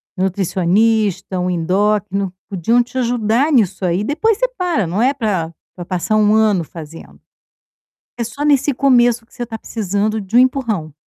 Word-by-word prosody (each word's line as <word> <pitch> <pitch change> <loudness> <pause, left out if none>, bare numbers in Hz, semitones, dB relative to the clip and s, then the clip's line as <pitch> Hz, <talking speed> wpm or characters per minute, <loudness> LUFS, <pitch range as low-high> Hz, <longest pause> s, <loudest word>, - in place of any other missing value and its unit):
nutricionista, 190 +1 0
um 180 0 -1
endócrino, 195 +2 0 0.2
podiam 225 +6 +1
te 245 - -20
ajudar 240 +4 +1
nisso 200 -7 +1
aí, 180 +3 0
depois 390 - +1
você - - +1
para, 345 - 0
não 185 +7 -2
é 265 +3 +2
para, 190 -10 -2 0.2
para 175 - -7
passar 185 +4 -2
1 210 -1 +3
ano 210 -6 +2
fazendo. 165 0 -11 1.0
É 235 - -1
só 280 +6 -5
nesse 285 -1 +3
começo 240 -3 +3
que - - -29
você 245 - -5
está 225 -1 -6
precisando 210 0 -2
de 200 +5 -1
um - - +8
empurrão. 230 - 0
215 Hz, 165 wpm, -17 LUFS, 185-245 Hz, 1.0 s, um